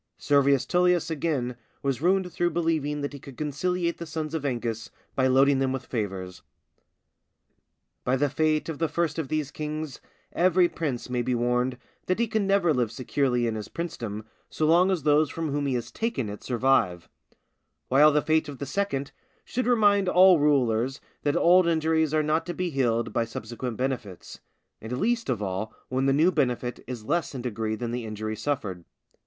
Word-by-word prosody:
Servius 140 -2 +3
Tullius 180 -2 +2
again, 140 -6 -1 0.3
was 135 -1 -1
ruined 180 0 +1
through 175 -1 +1
believing 155 -3 -1
that 145 0 -4
he 140 - -8
could 135 -1 -12
conciliate 170 +4 -1
the 170 - -6
sons 155 -1 -4
of 160 -3 -2
Ancus 115 -4 -3 0.2
by 130 -1 +2
loading 135 +1 +4
them 135 -1 +1
with 130 -1 -4
favours. 95 -5 -4 1.6
By 125 - +1
the 145 +2 +2
fate 155 +2 +1
of 160 -3 -5
the 165 - +1
first 160 +1 -1
of 155 - -2
these 150 0 -2
kings 155 -1 -5 0.3
every 180 0 +4
prince 155 -7 -3
may 125 -1 -1
be 125 +1 0
warned 125 +1 0 0.3
that 185 - +1
he 235 +1 +1
can 215 -2 0
never 195 -5 +3
live 120 -5 0
securely 125 0 0
in 115 - 0
his 110 -1 -5
princedom 115 -11 -5 0.2
so 155 - -1
long 175 +4 +5
as 180 -6 0
those 150 0 +4
from 160 0 -3
whom 145 0 -1
he 130 - 0
has 120 -1 -4
taken 225 - -2
it 105 - -7
survive; 120 -9 +1 0.8
while 145 +4 +6
the 150 0 +2
fate 155 -1 +1
of 140 - -7
the 140 - -5
second 140 -3 -2 0.3
should 250 0 -2
remind 205 -5 +4
all 180 -2 +6
rulers 130 -3 +2 0.2
that 145 -1 +1
old 180 +1 +5
injuries 160 -1 +2
are 155 0 +2
not 155 +2 +1
to 175 - -4
be 180 -1 -2
healed 120 -4 0
by 115 - +1
subsequent 115 +1 -6
benefits, 125 -8 -4 0.4
and 115 +3 -4
least 235 - 0
of 115 -5 -1
all 95 +3 -3 0.2
when 130 +1 0
the - - +4
new 155 +6 +4
benefit 125 -6 -1
is 120 -4 -6
less 170 +1 -1
in 125 - -5
degree 110 -2 -2
than 120 +1 -4
the 120 -1 -3
injury 110 0 -4
suffered. 110 -7 -3
140 Hz, 185 wpm, -26 LUFS, 120-165 Hz, 1.6 s, while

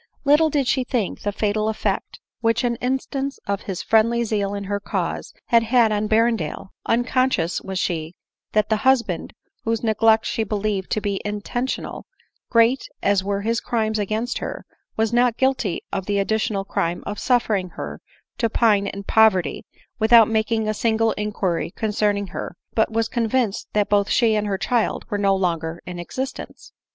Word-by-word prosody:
Little 300 +3 +5
did 285 -2 +1
she 260 0 +2
think 245 -6 -2
the 205 - -1
fatal 215 +1 0
effect 220 - -2 0.2
which 230 +1 +1
an 240 -1 +1
instance 265 +2 -2
of 200 0 -2
his 185 - -3
friendly 230 +2 +3
zeal 205 -3 -1
in 200 - -4
her 200 +1 -2
cause - - -3
had 235 -1 +4
had 230 -1 +3
on 210 0 0
Berrendale; 225 -3 +1 0.2
unconscious 245 -6 +1
was 190 -1 -5
she 165 -2 -2 0.4
that 215 0 +2
the 220 - +2
hus 260 +2 +4
band, 180 -6 -5 0.3
whose 225 0 -1
neglect 220 0 +3
she 225 - -1
believed 205 -2 -2
to 215 - 0
be 200 -1 -2
intentional, 210 +5 -4 0.4
great 230 +3 +3 0.2
as 200 -2 +3
were 200 0 -1
his 230 +2 0
crimes 220 -2 -1
against 215 +4 -2
her, - - -6 0.3
was 225 +1 +1
not 240 -1 +3
guilty 260 -8 0
of 195 -2 -2
the 205 - 0
addi 200 +2 +1
tional 195 -2 -2
crime 170 +1 -1
of 205 0 -4
suffering 215 -7 +1
her - - -6 0.4
to 230 - +2
pine 210 -3 +3
in 200 0 -5
poverty 195 -6 +3 0.3
without 225 0 +7
making 220 0 0
a 215 - +1
single 225 +1 +1
inquiry 205 -5 -2
concerning 210 0 0
her, 175 - -6 0.2
but 220 0 +2
was 225 0 +1
con 230 -2 -1
vinced 235 -4 0
that 210 -1 +2
both 205 -1 +2
she 230 -3 +3
and 210 -1 0
her 195 -1 -1
child 235 +2 0
were 205 - 0
no 195 -1 +3
longer 170 -3 -1
in 180 -1 -6
existence. 260 +10 -6
215 Hz, 175 wpm, -22 LUFS, 200-230 Hz, 0.4 s, without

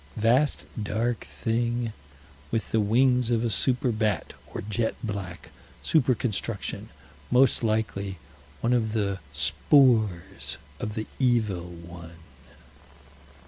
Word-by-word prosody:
Vast 120 +7 +3 0.2
dark 110 +3 0
thing 115 0 -1 0.6
with 115 -1 -2
the 110 - +3
wings 125 +3 +3
of 115 -1 +2
a 115 - 0
super 125 +2 +2
bat, 110 -6 -1
or - - -6
jet 110 +3 -1
black 100 -5 -5 0.3
super 130 - +3
construction; 110 -2 -3 0.4
most 130 +2 +4
likely 105 -3 -1 0.4
one 120 +1 +2
of 110 -3 +1
the 100 -3 0
spores 95 - +2 0.2
of 105 - -4
the 110 - -2
Evil 110 -9 +1
One. 85 -1 -10
110 Hz, 110 wpm, -27 LUFS, 100-120 Hz, 0.6 s, most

